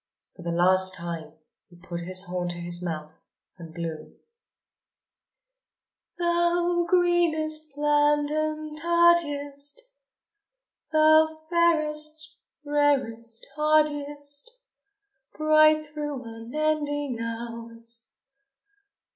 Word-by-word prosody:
For - - -13
the 170 - -5
last 185 +2 +4
time 170 -3 -6 0.3
he 175 - -19
put 175 0 -7
his 185 +2 +2
horn 180 -1 -3
to 175 - -4
his 175 0 -2
mouth 155 -3 -6 0.4
and 165 -1 -10
blew: 165 -2 -7 2.0
Thou 345 0 +1
greenest 315 -4 +1
plant 295 0 +2
and 310 0 -2
tardiest, 320 - +1 1.1
Thou 315 0 +4
fairest, 310 -2 +1 0.3
rarest, 265 -6 0
hardiest, 295 +4 0 0.8
Bright 310 0 +4
through 295 -3 -6
unending 290 +3 -2
hours! 230 0 -7
290 Hz, 80 wpm, -26 LUFS, 225-310 Hz, 2.0 s, last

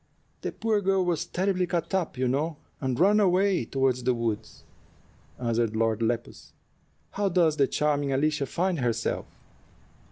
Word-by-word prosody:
"The - - -3
poor 220 -2 0
girl 195 -1 +2
was 170 -3 -1
terribly 185 -1 0
cut 170 0 -2
up, 180 -8 -1
you 130 0 +1
know, 145 +5 -1 0.2
and 130 -2 -2
ran 205 +4 +5
away 190 - +3
toward 135 0 +1
the 125 0 0
woods," 115 -3 -4 0.7
answered 115 -2 0
Lord 110 0 +1
Lepus. 115 +1 -3 0.6
"How 200 -1 0
does 170 -4 +2
the 140 - +4
charming 145 -2 0
Alicia 145 +1 +1
find 180 +1 -1
herself? 115 -2 -1
150 Hz, 150 wpm, -27 LUFS, 125-185 Hz, 0.7 s, ran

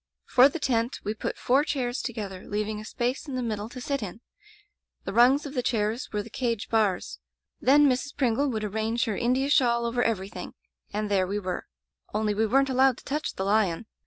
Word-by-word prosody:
*'For 260 +2 +6
the 310 - -4
tent, 240 -4 0
we 210 - -2
put 215 - -4
four 265 +4 +3
chairs 260 -4 -2
together, 205 -6 -6
leaving 210 +1 -2
a - - -10
space 245 +7 -2
in 270 - -4
the 255 - -1
middle 215 -2 -3
to 255 - -8
sit 275 +1 -2
in. 205 +1 -6 0.8
The 195 - -5
rungs 255 +6 +5
of 285 - -6
tfie 250 -3 -1
chairs 225 0 -1
were 210 -1 -2
the 230 - -13
cage 230 -4 -2
bars. 210 -5 0 0.4
Then 290 +3 +5
Mrs. 265 +2 -1
Pringle 275 +1 +2
would 220 -4 -2
arrange 220 +3 -1
her 220 -4 -2
India 255 +4 +1
shawl 235 -4 +3
over 240 +1 0
everything, 205 -4 -3 0.4
and 210 0 -2
there 190 -2 +2
we 200 +2 -2
were. 185 -3 -4 0.5
Only 215 -1 +1
we 220 +2 +1
weren't 270 +4 +3
allowed 260 -1 +4
to - - -14
touch 300 +2 -3
the 190 - -2
lion. 200 -2 +1
230 Hz, 205 wpm, -27 LUFS, 210-260 Hz, 0.8 s, For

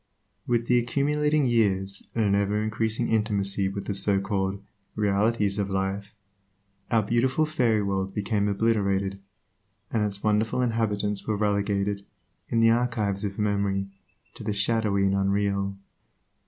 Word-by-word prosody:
With 120 -1 +1
the 125 0 +4
accumulating 150 +4 +1
years, 100 -5 +1
and 110 -2 +2
an 100 - +2
ever 100 +1 +1
increasing 110 +2 -1
intimacy 100 -3 0
with 100 0 -5
the 100 - -2
so 100 0 +2
called 95 0 -1 0.4
"realities" 105 0 +1
of 100 -1 -1
life, 95 +2 -3 0.7
our 115 -2 +3
beautiful 130 +8 +1
fairy 120 -9 +1
world 95 -1 -1
became 105 0 0
obliterated, 100 -2 0 0.7
and 110 -2 +1
its 100 -1 -2
wonderful 110 +4 +1
inhabitants 105 -4 -1
were 110 -1 0
relegated, 100 -1 0 0.5
in 115 - +2
the 115 0 +6
archives 110 -4 0
of 100 -1 -3
memory, 100 -2 0 0.4
to - - -10
the 105 0 -1
shadowy 100 -1 +1
and 95 - +2
unreal. 100 0 0
105 Hz, 140 wpm, -26 LUFS, 100-115 Hz, 0.7 s, the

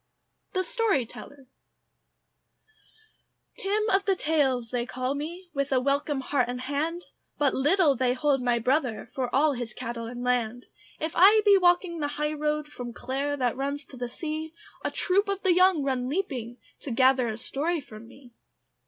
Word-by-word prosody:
THE 370 - +1
STORYTELLER 290 - -2 2.1
Tim 425 +2 0
of 390 +1 +2
the 390 - +2
Tales 270 -8 0
they 245 -1 -1
call 255 +1 -2
me, 340 +5 -6
With 280 -1 -1
a 260 - +4
welcome 280 +1 0
heart 265 -2 0
and 250 0 -4
hand; 305 +6 -2 0.3
But 285 -2 +2
little 295 +2 +3
they 250 0 +1
hold 280 -1 +1
my 245 -1 +2
brother 250 0 0
For 255 -2 -2
all 290 +2 +3
his 240 -3 -6
cattle 230 -1 -5
and 245 +1 -6
land. 245 -1 0 0.3
If 315 +1 -2
I 410 +5 +7
be 405 -1 +7
walking 355 -2 +3
the 290 - 0
high 300 0 0
road 300 0 -1
From 245 -5 -7
Clare 275 +4 -2
that 250 -3 0
goes 280 +2 -3
to - - -14
the 245 -1 -4
sea, 315 +4 -5 0.3
A - - 0
troop 395 +2 +1
of 395 -1 -2
the 375 -2 +4
young 365 -4 +4
run 255 -2 -1
leaping 265 - -3 0.2
To - - -7
gather 255 +1 +3
a 220 -1 -3
story 310 +8 -2
from 225 -4 -12
me. 245 -1 -17
280 Hz, 170 wpm, -27 LUFS, 250-330 Hz, 2.1 s, I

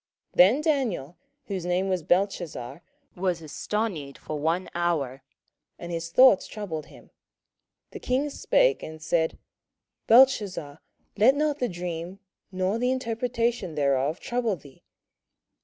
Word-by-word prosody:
27:004:019 - - -23
Then 210 +11 +7
Daniel, 245 - -1 0.3
whose 190 -4 -4
name 180 +2 +1
was 185 -2 0
Belteshazzar, 175 -6 -1 0.3
was 180 -2 -1
astonied 160 -3 -3
for 150 - -6
one 165 +5 0
hour, 155 -7 -1 0.6
and 175 - -8
his 165 0 -4
thoughts 250 +1 +6
troubled 170 -8 -6
him. - - -17 0.8
The - - -8
king 270 +4 -1
spake, - - +2
and 160 0 -8
said, 160 +1 0 0.7
Belteshazzar, 210 - +4 0.4
let 235 +7 +5
not 300 0 0
the 245 - 0
dream, 175 0 -5 0.3
or 185 +4 -1
the 250 +1 +1
interpretation 235 -6 -1
thereof, 140 +2 +1
trouble 240 -4 -1
thee. 140 -5 -17
185 Hz, 125 wpm, -26 LUFS, 160-235 Hz, 0.8 s, Then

